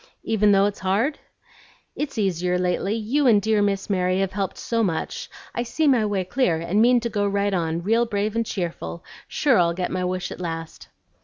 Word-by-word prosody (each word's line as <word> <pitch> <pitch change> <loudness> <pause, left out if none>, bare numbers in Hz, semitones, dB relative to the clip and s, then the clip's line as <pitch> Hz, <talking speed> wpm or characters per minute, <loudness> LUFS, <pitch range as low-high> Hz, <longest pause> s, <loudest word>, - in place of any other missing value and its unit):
"Even 210 -2 +3
though 195 0 +5
it's 205 0 -2
hard?" 205 +10 0 0.8
"It's 295 -4 -4
easier 180 -3 0
lately; 180 +3 0
you 250 +6 +1
and 220 -4 +6
dear 215 +1 +1
Miss 200 -1 0
Mary 185 -2 +1
have 195 -1 -1
helped 195 -2 -3
so 230 -1 -1
much, 170 -7 -2 0.2
I - - -1
see 245 +7 -1
my 240 -6 +3
way 200 -2 -1
clear, 185 -2 +1
and 170 +6 0
mean 245 +1 +5
to 235 - -1
go 205 -1 0
right 200 0 0
on, 165 -2 -1
real 230 +4 +2
brave 210 0 -1
and 230 - +1
cheerful, 175 -4 -5 0.2
sure 265 -8 +2
I'll 170 -1 +2
get 180 0 -2
my 185 0 -1
wish 185 0 -2
at - - -7
last." 165 -2 -6
200 Hz, 205 wpm, -23 LUFS, 180-225 Hz, 0.8 s, and